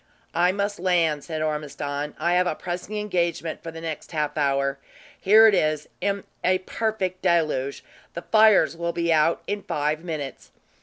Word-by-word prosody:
"I 175 Hz, +1 st, +3 dB
must 200 Hz, 0 st, -2 dB
land," 170 Hz, -5 st, +1 dB
said 155 Hz, -2 st, -4 dB
Ormiston. 150 Hz, -1 st, -3 dB
"I 170 Hz, +3 st, +1 dB
have 180 Hz, 0 st, +3 dB
a 155 Hz, -, -1 dB
pressing 180 Hz, +5 st, -5 dB
engagement 170 Hz, -5 st, -2 dB
for 165 Hz, -, -7 dB
the 165 Hz, 0 st, -9 dB
next 160 Hz, 0 st, -6 dB
half 150 Hz, -2 st, -1 dB
hour. 140 Hz, -2 st, 0 dB, 0.4 s
Here 215 Hz, +3 st, +7 dB
it 220 Hz, -, +6 dB
is, 155 Hz, -4 st, +1 dB
in 200 Hz, +1 st, -1 dB, 0.2 s
a 185 Hz, 0 st, +3 dB
perfect 190 Hz, -1 st, -3 dB
deluge; 155 Hz, -6 st, 0 dB, 0.3 s
the 170 Hz, -, -5 dB
fires 215 Hz, -5 st, +5 dB
will 170 Hz, 0 st, -3 dB
be 170 Hz, -1 st, +1 dB
out 155 Hz, +1 st, +2 dB
in 205 Hz, 0 st, -3 dB
five 150 Hz, 0 st, -2 dB
minutes." 155 Hz, -5 st, -6 dB
170 Hz, 165 wpm, -24 LUFS, 150-185 Hz, 0.4 s, Here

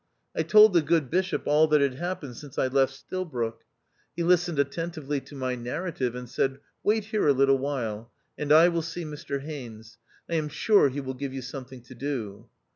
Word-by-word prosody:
I -, -, +1 dB
told 215 Hz, -1 st, +7 dB
the 170 Hz, -, +5 dB
good 155 Hz, -3 st, +1 dB
Bishop 185 Hz, +2 st, 0 dB
all 150 Hz, +2 st, +4 dB
that 150 Hz, -1 st, +4 dB
had 140 Hz, -2 st, +2 dB
happened 145 Hz, -3 st, -5 dB
since 140 Hz, +1 st, -11 dB
I -, -, +2 dB
left 135 Hz, 0 st, +2 dB
Stilbroke. 135 Hz, -7 st, -4 dB, 0.5 s
He 170 Hz, -, -1 dB
listened 175 Hz, -2 st, +2 dB
attentively 145 Hz, 0 st, -2 dB
to 145 Hz, -, -13 dB
my 130 Hz, -2 st, -2 dB
narrative, 125 Hz, +1 st, -3 dB
and 125 Hz, 0 st, -6 dB
said, 135 Hz, +3 st, -1 dB
" -, -, -49 dB
Wait 215 Hz, +1 st, +2 dB
here 215 Hz, -6 st, 0 dB
a 145 Hz, -, +6 dB
little 135 Hz, 0 st, +3 dB
while, 120 Hz, -5 st, -3 dB, 0.2 s
and 150 Hz, -1 st, -3 dB
I 160 Hz, +3 st, +8 dB
will 170 Hz, -1 st, 0 dB
see 170 Hz, +2 st, -5 dB
Mr 145 Hz, -2 st, -5 dB
Haines: 120 Hz, -7 st, -9 dB, 0.3 s
I -, -, -5 dB
am 150 Hz, -1 st, -1 dB
sure 165 Hz, +1 st, +4 dB
he 140 Hz, +2 st, -4 dB
will 130 Hz, -1 st, -5 dB
give 135 Hz, +1 st, -5 dB
you 130 Hz, -, -5 dB
something 130 Hz, -1 st, -8 dB
to 130 Hz, -, -13 dB
do." 120 Hz, -5 st, -5 dB
140 Hz, 200 wpm, -27 LUFS, 130-165 Hz, 0.5 s, I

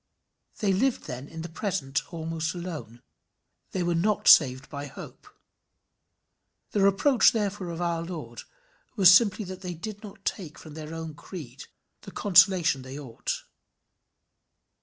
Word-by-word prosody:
They 200 Hz, -3 st, +2 dB
lived 255 Hz, +7 st, +1 dB
then 125 Hz, +3 st, -7 dB
in 160 Hz, +1 st, -8 dB
the -, -, -5 dB
present 165 Hz, -4 st, -3 dB
almost 165 Hz, 0 st, -3 dB
alone; 160 Hz, -10 st, -7 dB, 0.7 s
they 185 Hz, -, -2 dB
were 175 Hz, 0 st, +1 dB
not 195 Hz, +4 st, 0 dB
saved 130 Hz, -2 st, +6 dB
by 145 Hz, -1 st, -6 dB
hope. -, -, -11 dB, 1.4 s
The 205 Hz, -, +1 dB
reproach 200 Hz, +7 st, +4 dB
therefore 205 Hz, -4 st, -2 dB
of 170 Hz, 0 st, -5 dB
our 170 Hz, -1 st, -1 dB
Lord 160 Hz, -9 st, -7 dB, 0.5 s
was 185 Hz, -4 st, +8 dB
simply 205 Hz, +1 st, +4 dB
that 185 Hz, 0 st, -8 dB
they 180 Hz, -2 st, -5 dB
did 205 Hz, +4 st, -7 dB
not 200 Hz, -2 st, -12 dB
take 170 Hz, -7 st, -4 dB
from 155 Hz, -, -12 dB
their 155 Hz, +1 st, -7 dB
own 160 Hz, -1 st, -6 dB
creed 145 Hz, -4 st, -10 dB, 0.4 s
the -, -, -10 dB
consolation 180 Hz, -7 st, +4 dB
they 130 Hz, +2 st, -8 dB
ought. 125 Hz, -6 st, -5 dB
170 Hz, 140 wpm, -27 LUFS, 150-195 Hz, 1.4 s, was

